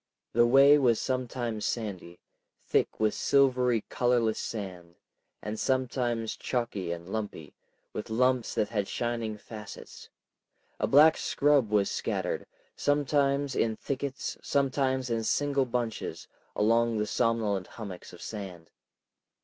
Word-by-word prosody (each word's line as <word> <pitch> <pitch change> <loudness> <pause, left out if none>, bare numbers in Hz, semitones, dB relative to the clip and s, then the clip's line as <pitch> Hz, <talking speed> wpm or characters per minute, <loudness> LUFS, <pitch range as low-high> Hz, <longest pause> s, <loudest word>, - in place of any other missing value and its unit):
The 120 +1 +5
way 140 +4 +7
was 120 -5 +3
sometimes 120 -4 -2
sandy, 95 -7 -4 0.4
thick - - 0
with 110 -1 +2
silvery 125 -4 +3
colorless 120 -3 +1
sand, 90 -6 -6 0.5
and 105 +2 -4
sometimes 120 -3 0
chalky 120 -8 -2
and 85 0 -6
lumpy, 100 -7 -5 0.4
with 105 - -5
lumps 125 +1 +1
that 105 - +1
had 105 -3 -1
shining 115 -3 -2
facets; 105 0 -10 0.7
a - - +1
black 155 +3 +7
scrub 140 -6 +2
was 105 -2 +2
scattered, - - -2 0.3
sometimes 140 -1 +1
in 110 -1 +1
thickets, 140 +2 -4
sometimes 130 -2 0
in 115 -1 0
single 140 +3 +1
bunches, 120 -2 -3 0.3
among 115 +2 +2
the 105 - 0
somnolent 105 -4 0
hummocks 100 -6 -9
of 90 - -11
sand. 95 -6 -7
115 Hz, 120 wpm, -29 LUFS, 105-130 Hz, 0.7 s, way